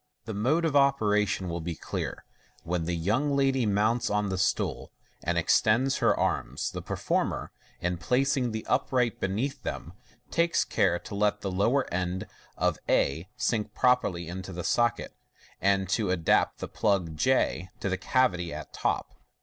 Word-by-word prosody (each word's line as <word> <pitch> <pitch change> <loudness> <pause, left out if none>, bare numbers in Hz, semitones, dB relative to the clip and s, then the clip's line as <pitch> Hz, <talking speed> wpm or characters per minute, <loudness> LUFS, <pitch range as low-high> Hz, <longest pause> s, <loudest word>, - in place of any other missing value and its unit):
The 110 - -5
mode 135 +12 +1
of 155 -3 0
operation 105 -9 +2
will 85 0 -3
now 80 - -8
be 85 -1 -3
clear. - - -5 0.4
When 85 -1 -2
the 85 +1 -1
young 115 - +1
ladyr 135 -4 +2
mounts 110 +4 +1
on 105 -1 0
the 95 - -2
stool, 95 - -1 0.3
and 85 +1 0
extends 110 +10 +3
her - - +2
arms, - - -1
the - - -5
performer, - - -2 0.3
in 90 -1 -1
placing 125 +3 +1
the 110 0 -4
upright 125 -4 +1
beneath 125 +9 -2
them, - - -5 0.4
takes 170 0 +2
care 85 -3 +2
to - - -10
let 105 0 +1
tb*5 95 -2 -3
lower 120 +7 +1
end 90 +1 -2 0.3
of - - +1
a 80 +6 +2
sink 110 -4 -1
properly 100 -9 +2
into 95 +2 -6
the 90 -1 -5
socket, 120 +3 0 0.5
and 100 -1 +2
to 105 -1 +1
adapt 85 -4 +2
the - - -5
plug 95 -7 0
j 90 -2 +1
to - - -2
the 95 - 0
cavity 90 -6 +1
at - - -8
top. - - -1
105 Hz, 165 wpm, -28 LUFS, 90-125 Hz, 0.5 s, extends